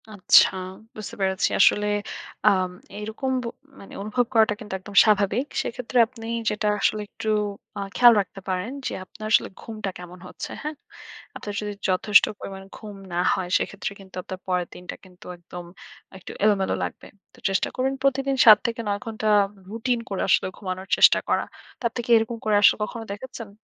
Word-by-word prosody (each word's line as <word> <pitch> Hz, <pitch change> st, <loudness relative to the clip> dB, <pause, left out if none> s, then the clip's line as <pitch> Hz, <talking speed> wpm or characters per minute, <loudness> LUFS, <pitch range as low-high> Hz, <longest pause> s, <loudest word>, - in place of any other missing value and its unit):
আচ্ছা, 190 Hz, -, +7 dB, 0.5 s
বুঝতে 215 Hz, +2 st, -7 dB
পেরেছি। 190 Hz, -1 st, +1 dB
আসলে 210 Hz, 0 st, +5 dB, 0.6 s
আম 185 Hz, -3 st, +4 dB, 0.3 s
এরকম 220 Hz, +5 st, -3 dB
বো -, -, -4 dB, 0.3 s
মানে 195 Hz, -, -13 dB
অনুভব 240 Hz, +4 st, 0 dB
করাটা 220 Hz, -2 st, +4 dB
কিন্তু 210 Hz, -3 st, -8 dB
একদম 200 Hz, +2 st, -12 dB
স্বাভাবিক। 210 Hz, +4 st, +2 dB, 0.2 s
সেক্ষেত্রে, 250 Hz, +1 st, -4 dB
আপনি 230 Hz, -2 st, -12 dB, 0.2 s
যেটা 210 Hz, 0 st, -1 dB
আসলে 215 Hz, -, +1 dB
একটু 220 Hz, -, -5 dB, 0.5 s
আ -, -, -3 dB, 0.2 s
খেয়াল 240 Hz, -1 st, +8 dB
রাখতে 195 Hz, -, -9 dB
পারেন, 185 Hz, +6 st, -2 dB, 0.2 s
যে -, -, -4 dB
আপনার 215 Hz, -, -10 dB
আসলে -, -, +4 dB
ঘুমটা 215 Hz, -3 st, -5 dB
কেমন 180 Hz, 0 st, -11 dB
হচ্ছে, -, -, -7 dB
হ্যাঁ? 300 Hz, +1 st, -4 dB, 0.6 s
আপনার 205 Hz, -, -6 dB
যদি 210 Hz, 0 st, -4 dB, 0.2 s
যথেষ্ট 200 Hz, +3 st, +5 dB
পরিমাণে 195 Hz, 0 st, -8 dB
ঘুম 210 Hz, -2 st, -9 dB, 0.2 s
না 175 Hz, -, 0 dB
হয়, 180 Hz, -2 st, -3 dB
সেক্ষেত্রে 200 Hz, 0 st, -4 dB
কিন্তু 190 Hz, -1 st, -14 dB
আপনার 185 Hz, +1 st, -7 dB
পরের 180 Hz, -1 st, 0 dB
দিনটা 180 Hz, -, -8 dB
কিন্তু 180 Hz, +2 st, -17 dB
একদম, 175 Hz, 0 st, -10 dB, 0.5 s
একটু 185 Hz, -, -10 dB
এলোমেলো 200 Hz, -3 st, +2 dB
লাগবে। -, -, -6 dB, 0.3 s
তো -, -, -19 dB
চেষ্টা 195 Hz, -, +1 dB
করবেন 265 Hz, +1 st, 0 dB
প্রতিদিন, 275 Hz, 0 st, +1 dB
৭ 215 Hz, -2 st, +10 dB
থেকে 230 Hz, 0 st, -3 dB
নয় 200 Hz, 0 st, -1 dB
ঘন্টা 220 Hz, -1 st, -3 dB, 0.4 s
রুটিন 235 Hz, +2 st, -1 dB
করে, 195 Hz, -, -2 dB
আসলে -, -, +3 dB
ঘুমানোর 185 Hz, -1 st, -5 dB
চেষ্টা -, -, +7 dB
করা। -, -, +2 dB, 0.4 s
তা -, -, -15 dB
আপনি 240 Hz, -, -4 dB
কি -, -, -12 dB
এরকম 225 Hz, +1 st, -1 dB
করে 215 Hz, -1 st, +3 dB
আসলে -, -, +7 dB
কখনো 225 Hz, +1 st, -5 dB
দেখেছেন? 230 Hz, 0 st, -8 dB
210 Hz, 175 wpm, -24 LUFS, 190-230 Hz, 0.6 s, ৭